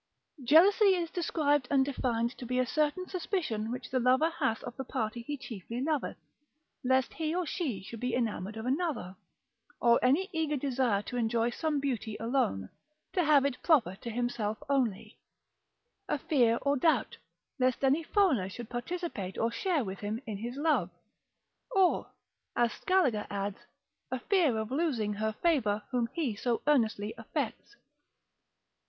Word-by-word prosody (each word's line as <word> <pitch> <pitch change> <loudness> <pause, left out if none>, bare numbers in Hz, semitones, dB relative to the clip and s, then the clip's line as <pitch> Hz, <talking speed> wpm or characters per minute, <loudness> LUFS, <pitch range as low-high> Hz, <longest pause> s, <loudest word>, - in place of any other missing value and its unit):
Jealousy 380 - +6
is 340 -2 -2
described 290 -6 +1
and 270 -1 +4
defined 240 -3 -1
to - - -7
be 250 +1 -1
a 255 - +3
certain 305 +8 0
suspicion 320 - -2
which 250 0 -6
the 255 - +2
lover 260 +6 +3
hath 225 -8 -1
of 245 - -7
the 265 - -4
party 235 -3 -3
he 290 +5 -4
chiefly 230 -3 -7
loveth, 295 +1 -1 0.7
lest 260 0 +2
he 320 0 -2
or 360 -1 0
she 270 - -3
should 230 +3 -8
be 250 0 -1
enamoured 220 -3 -2
of 220 - -5
another: 265 - -1 0.6
or 235 -1 +5
any 290 +10 +3
eager 315 -2 0
desire 255 -6 +1
to 245 - -5
enjoy 230 0 +1
some 300 +3 -1
beauty 235 -6 -2
alone, 225 - 0 0.4
to 360 - +2
have 295 -3 +5
it 275 -3 -2
proper 250 - +3
to 235 - -7
himself 230 -2 -2
only: 255 -8 -1 0.9
a - - +1
fear 240 -7 +3
or 280 0 +2
doubt, 315 +4 +1 0.4
lest 255 +1 +1
any 275 +4 +4
foreigner 320 - +2
should 225 +4 -8
participate 240 - -4
or 230 +1 +1
share 330 +2 0
with 195 -2 -6
him 210 +2 -3
in 215 -3 -4
his 240 +3 -5
love. 280 - +1 0.9
Or 380 -2 +3 0.5
(as 240 -1 +2
Scaliger 300 - +1
adds) 200 0 -3 0.5
a 260 - -1
fear 320 - +2
of 220 +1 -3
losing 260 -9 0
her 220 +1 -1
favour 215 -12 +2
whom 240 -2 0
he 280 -10 -1
so 235 +2 -1
earnestly 220 -7 +2
affects. 225 - -4
250 Hz, 160 wpm, -30 LUFS, 225-300 Hz, 0.9 s, Jealousy